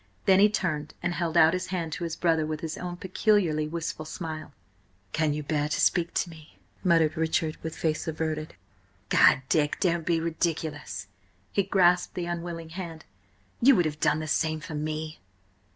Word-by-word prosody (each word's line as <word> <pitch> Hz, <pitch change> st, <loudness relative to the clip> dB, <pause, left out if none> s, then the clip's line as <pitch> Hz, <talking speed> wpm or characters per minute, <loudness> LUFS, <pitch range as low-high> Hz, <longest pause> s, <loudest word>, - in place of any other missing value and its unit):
Then 190 Hz, -1 st, +6 dB
he 210 Hz, +1 st, +7 dB
turned 155 Hz, -7 st, -2 dB
and 175 Hz, 0 st, 0 dB
held 170 Hz, -1 st, -1 dB
out 160 Hz, +1 st, +7 dB
his 185 Hz, 0 st, -2 dB
hand 175 Hz, -4 st, -3 dB
to 175 Hz, -, -4 dB
his 165 Hz, -1 st, -3 dB
brother 165 Hz, -2 st, +2 dB
with 155 Hz, 0 st, -3 dB
his 160 Hz, -1 st, -4 dB
own 175 Hz, -1 st, -5 dB
peculiarly 185 Hz, -5 st, +1 dB
wistful 165 Hz, 0 st, -4 dB
smile. 155 Hz, -2 st, -6 dB, 0.6 s
"Can 155 Hz, -1 st, +1 dB
you 150 Hz, -, -4 dB
bear 150 Hz, 0 st, -1 dB
to -, -, -1 dB
speak 170 Hz, -2 st, +2 dB
to 175 Hz, -, +1 dB
me?" 155 Hz, -1 st, -15 dB, 0.3 s
muttered 165 Hz, -3 st, +3 dB
Richard, 160 Hz, -1 st, 0 dB
with 160 Hz, 0 st, -5 dB
face 160 Hz, 0 st, -1 dB
averted. 155 Hz, -1 st, -3 dB, 0.5 s
"Gad, 135 Hz, -, +5 dB
Dick, 150 Hz, 0 st, +1 dB
don't 170 Hz, -2 st, +1 dB
be 165 Hz, 0 st, +1 dB
ridiculous!" 160 Hz, -, -2 dB, 0.5 s
He 200 Hz, -, +2 dB
grasped 180 Hz, -2 st, +3 dB
the 180 Hz, -, -2 dB
unwilling 170 Hz, -1 st, -5 dB
hand. 165 Hz, -2 st, -7 dB, 0.6 s
"You 265 Hz, +2 st, +7 dB
would 175 Hz, -, +3 dB
have 150 Hz, -1 st, -3 dB
done 150 Hz, -, +3 dB
the 155 Hz, 0 st, -4 dB
same 155 Hz, +1 st, 0 dB
for 155 Hz, +1 st, -8 dB
me!" 155 Hz, +1 st, -4 dB
160 Hz, 180 wpm, -27 LUFS, 155-175 Hz, 0.6 s, he